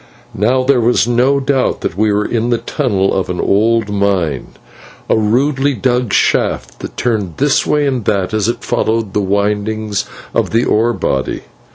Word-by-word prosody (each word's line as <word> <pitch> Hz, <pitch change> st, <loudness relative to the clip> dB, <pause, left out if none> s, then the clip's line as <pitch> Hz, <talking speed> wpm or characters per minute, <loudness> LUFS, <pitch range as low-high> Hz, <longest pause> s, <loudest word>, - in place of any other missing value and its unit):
Now 125 Hz, +6 st, +1 dB
there 130 Hz, -2 st, +3 dB
was 120 Hz, 0 st, +2 dB
no 125 Hz, +4 st, +2 dB
doubt 135 Hz, -1 st, 0 dB
that -, -, -3 dB
we 105 Hz, +2 st, +1 dB
were 105 Hz, +1 st, 0 dB
in 120 Hz, 0 st, -1 dB
the 120 Hz, -, +2 dB
tunnel 105 Hz, -9 st, -1 dB
of 95 Hz, -2 st, -1 dB
an 90 Hz, -, -3 dB
old 110 Hz, +1 st, +1 dB
mine, 95 Hz, -9 st, 0 dB, 0.6 s
a -, -, +2 dB
rudely 135 Hz, +6 st, +1 dB
dug 125 Hz, 0 st, 0 dB
shaft -, -, 0 dB
that -, -, -8 dB
turned 105 Hz, -9 st, -1 dB
this 140 Hz, 0 st, +2 dB
way 150 Hz, -1 st, +2 dB
and 130 Hz, -4 st, -1 dB
that 100 Hz, -1 st, 0 dB
as 110 Hz, -1 st, +1 dB
it 120 Hz, +1 st, -2 dB
followed 115 Hz, -3 st, -1 dB
the 105 Hz, -, +1 dB
windings 105 Hz, +1 st, -1 dB, 0.3 s
of -, -, 0 dB
the 115 Hz, +1 st, +1 dB
ore 115 Hz, +2 st, +2 dB
body. 65 Hz, -, -2 dB
110 Hz, 175 wpm, -15 LUFS, 100-125 Hz, 0.6 s, there